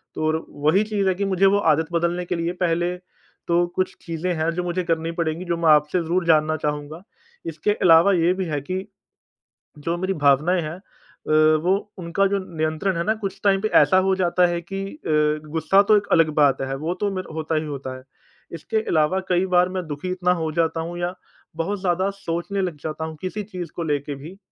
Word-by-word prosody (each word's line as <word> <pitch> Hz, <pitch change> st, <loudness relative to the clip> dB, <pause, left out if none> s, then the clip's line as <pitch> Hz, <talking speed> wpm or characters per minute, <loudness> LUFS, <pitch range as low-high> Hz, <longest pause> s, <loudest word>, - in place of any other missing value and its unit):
तो 155 Hz, 0 st, 0 dB
र 160 Hz, +1 st, -2 dB
वही 155 Hz, +8 st, +2 dB
चीज़ 210 Hz, -2 st, -1 dB
है 190 Hz, -, +3 dB
कि 200 Hz, +2 st, -1 dB
मुझे 195 Hz, 0 st, +2 dB
वो 195 Hz, +1 st, +5 dB, 0.2 s
आदत 160 Hz, +2 st, -1 dB
बदलने 170 Hz, +1 st, 0 dB
के 180 Hz, -, -2 dB
लिए 170 Hz, 0 st, -1 dB
पहले 175 Hz, +1 st, 0 dB, 0.5 s
तो 175 Hz, +1 st, +3 dB
कुछ 185 Hz, -, -1 dB
चीज़ें 170 Hz, +2 st, -3 dB
हैं 160 Hz, +1 st, 0 dB
जो 180 Hz, -, -1 dB
मुझे 175 Hz, +1 st, -2 dB
करनी 165 Hz, -1 st, -1 dB
पड़ेंगी 165 Hz, +2 st, -2 dB
जो 170 Hz, -1 st, -1 dB
मैं 165 Hz, -1 st, +2 dB
आपसे 150 Hz, +3 st, +4 dB
ज़रूर 175 Hz, +2 st, 0 dB
जानना 155 Hz, -1 st, +3 dB
चाहूँगा। 150 Hz, +2 st, -4 dB, 0.5 s
इसके 165 Hz, +5 st, -1 dB
अलावा 180 Hz, -1 st, +5 dB
ये 175 Hz, 0 st, +3 dB
भी 190 Hz, 0 st, -3 dB
है 150 Hz, -3 st, -2 dB
कि 185 Hz, +6 st, -4 dB, 0.9 s
जो 165 Hz, +3 st, -2 dB
मेरी 185 Hz, +2 st, -1 dB
भावनाएँ 150 Hz, +4 st, +3 dB
हैं 155 Hz, 0 st, -5 dB
अ, 185 Hz, -4 st, -12 dB, 0.3 s
वो 195 Hz, +3 st, 0 dB
उनका 180 Hz, +2 st, 0 dB
जो 200 Hz, 0 st, 0 dB, 0.2 s
नियंत्रण 160 Hz, +4 st, -1 dB
है 170 Hz, -, 0 dB
ना 220 Hz, -, +2 dB
कुछ 195 Hz, -2 st, -4 dB
टाइम 195 Hz, -1 st, +3 dB
पे 215 Hz, -, +1 dB
ऐसा 185 Hz, -, +4 dB
हो 190 Hz, 0 st, +2 dB
जाता 180 Hz, -1 st, +2 dB
है 175 Hz, 0 st, -1 dB
कि 195 Hz, +3 st, -5 dB
अ, 150 Hz, -, 0 dB
गुस्सा 165 Hz, +5 st, +3 dB
तो 210 Hz, +1 st, +5 dB
एक 200 Hz, -1 st, -2 dB
अलग 165 Hz, -1 st, +5 dB
बात 135 Hz, -2 st, +3 dB
है 135 Hz, 0 st, -2 dB
वो 160 Hz, +5 st, -2 dB
तो 205 Hz, -1 st, +1 dB
मेर 185 Hz, -1 st, -4 dB
होता 160 Hz, 0 st, -2 dB
ही 155 Hz, -, 0 dB
होता 140 Hz, -3 st, -6 dB
है। 130 Hz, -, -14 dB, 0.5 s
इसके 165 Hz, +6 st, -3 dB
अलावा 160 Hz, +4 st, +2 dB
कई 180 Hz, +1 st, +2 dB
बार 180 Hz, +1 st, +4 dB
मैं 185 Hz, -1 st, -4 dB
दुखी 145 Hz, +5 st, -5 dB
इतना 180 Hz, -1 st, +1 dB
हो 160 Hz, -3 st, -2 dB
जाता 165 Hz, 0 st, 0 dB
हूँ 170 Hz, +1 st, -5 dB
या 175 Hz, +1 st, -2 dB, 0.4 s
बहुत 190 Hz, +5 st, -2 dB
ज़्यादा 185 Hz, +1 st, +1 dB
सोचने 195 Hz, +1 st, -3 dB
लग 180 Hz, -4 st, -2 dB
जाता 160 Hz, 0 st, -4 dB
हूँ 160 Hz, -, -7 dB
किसी 205 Hz, +3 st, -4 dB
चीज़ 180 Hz, -4 st, -7 dB
को 170 Hz, -, -3 dB
लेके 145 Hz, -2 st, -2 dB
भी 160 Hz, +8 st, -11 dB
170 Hz, 215 wpm, -23 LUFS, 155-185 Hz, 0.9 s, वो